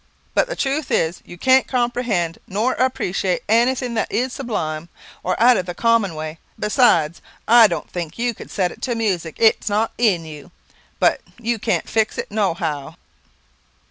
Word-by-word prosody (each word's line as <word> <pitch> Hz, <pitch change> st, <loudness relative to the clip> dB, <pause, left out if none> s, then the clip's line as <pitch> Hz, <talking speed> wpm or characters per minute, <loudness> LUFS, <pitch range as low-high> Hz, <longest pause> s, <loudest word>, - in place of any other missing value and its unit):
But -, -, +2 dB
the -, -, -4 dB
truth 275 Hz, +1 st, -1 dB
is, 165 Hz, +2 st, 0 dB
you 175 Hz, -, -11 dB
can't 260 Hz, +7 st, +4 dB
comprehend 240 Hz, -9 st, -1 dB
nor 215 Hz, +7 st, 0 dB
appreciate 195 Hz, -7 st, -1 dB
anything 245 Hz, +2 st, +2 dB
that 220 Hz, -, -1 dB
is 250 Hz, +2 st, -1 dB
sublime, 170 Hz, -, -4 dB, 0.3 s
or 185 Hz, -, -2 dB
out 240 Hz, +1 st, +6 dB
of 185 Hz, -, -3 dB
the 175 Hz, -, -5 dB
common 230 Hz, -6 st, +2 dB
way. 155 Hz, +1 st, -6 dB, 0.2 s
Besides, 190 Hz, -, +2 dB, 0.3 s
I 230 Hz, 0 st, +8 dB
don't 170 Hz, -6 st, -4 dB
think 170 Hz, -3 st, -6 dB
you 240 Hz, 0 st, 0 dB
could -, -, -11 dB
set 185 Hz, -3 st, 0 dB
it -, -, -13 dB
to 245 Hz, -2 st, -1 dB
music; 185 Hz, -8 st, -1 dB
it 225 Hz, -1 st, +5 dB
is -, -, -3 dB
not 215 Hz, +2 st, +1 dB
in 195 Hz, -9 st, +2 dB
you, 150 Hz, 0 st, -10 dB, 0.5 s
and -, -, +5 dB, 0.2 s
you 235 Hz, -1 st, -1 dB
can't 220 Hz, -, -1 dB
fix 220 Hz, -1 st, 0 dB
it -, -, -5 dB
no 205 Hz, -5 st, +1 dB
how." 150 Hz, -5 st, -4 dB
215 Hz, 175 wpm, -21 LUFS, 170-240 Hz, 0.5 s, I